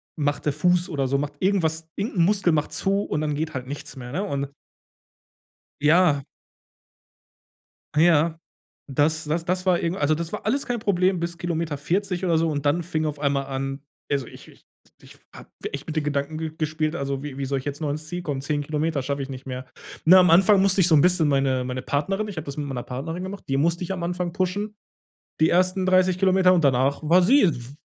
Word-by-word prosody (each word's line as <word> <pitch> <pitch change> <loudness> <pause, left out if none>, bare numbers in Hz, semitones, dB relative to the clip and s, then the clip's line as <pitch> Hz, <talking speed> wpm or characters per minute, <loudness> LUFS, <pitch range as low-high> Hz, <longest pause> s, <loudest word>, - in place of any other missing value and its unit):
macht 145 -1 -1
der 150 - +1
Fuß 175 +4 +2
oder 140 -5 -1
so 140 - +1
macht 145 +1 -3
irgendwas, 165 -4 0
irgend 205 0 -3
'n 170 - +5
Muskel 195 -3 +2
macht 150 -1 -1
zu 195 +1 +1
und 150 - -2
dann 150 -1 -1
geht 160 +2 -3
halt 130 -1 -4
nichts 145 +2 -7
mehr, 125 -2 -8
ne? 185 +8 -2
Und 140 -8 -3 1.3
Ja. 150 -1 +4 1.7
Ja, 160 0 +3 0.5
das 150 +3 +1
das 165 +3 -2
das 185 +1 -1
war 180 -2 +3
irgend 170 +3 -2
also 150 +1 +2
das 165 +1 -3
war - - -6
alles 270 +6 0
kein 245 -1 -2
Problem 185 -3 +1
bis 170 0 -3
Kilometer 165 -3 -2
40 180 +5 -1
oder 170 -3 +2
so 165 +1 +2
und 145 -2 -3
dann 155 +4 +2
fing 155 -2 -2
auf 150 -1 -3
einmal 140 -1 0
an 135 +1 -4 0.3
also, 140 -2 0
ich - - -13
ich - - -19 0.4
ich - - -15 0.2
habe - - -12 0.2
echt 140 - -6
mit 160 - -5
den 155 - 0
Gedanken 145 +1 -2
ge 160 -1 -3
gespielt, 155 0 -1
also, 140 -2 -3
wie 145 -2 -7
wie 140 - -2
soll 135 0 -1
ich 130 - -11
jetzt 145 0 -4
noch 150 - -1
ins 155 +2 -5
Ziel 175 +1 -5
kommen? 145 -5 -3
10 145 +1 -1
Kilometer 150 -1 -1
schaffe 140 +1 -2
ich 135 - -5
nicht 130 0 -8
mehr. 130 -1 -6 0.4
Na, 185 +3 +8
am 180 -1 +5
Anfang 190 +3 +6
musste 195 0 +3
ich 175 - +4
so 165 - +5
'n 145 - +6
bisschen 180 -2 +3
meine 135 -2 +1
meine 125 0 -4
Partnerin 195 +9 -1
ich 200 - -8
habe 160 - -4
das 140 0 -6
mit 150 - -2
meiner 130 -3 -4
Partnerin 160 +8 -5
gemacht, 195 +1 -7
die 135 - 0
musste 170 +5 +1
ich 180 - -4
am 185 - -3
Anfang 175 0 -2
pushen, 200 +4 -2 0.7
die 160 - +4
ersten 185 +1 +2
30 185 -1 +3
Kilometer 185 -1 +4
und 175 - +3
danach 135 +1 +2
war 175 +4 +5
sie, 270 +10 +5
äh, 185 - +5
dw 125 +1 -9
160 Hz, 225 wpm, -24 LUFS, 140-180 Hz, 1.7 s, Na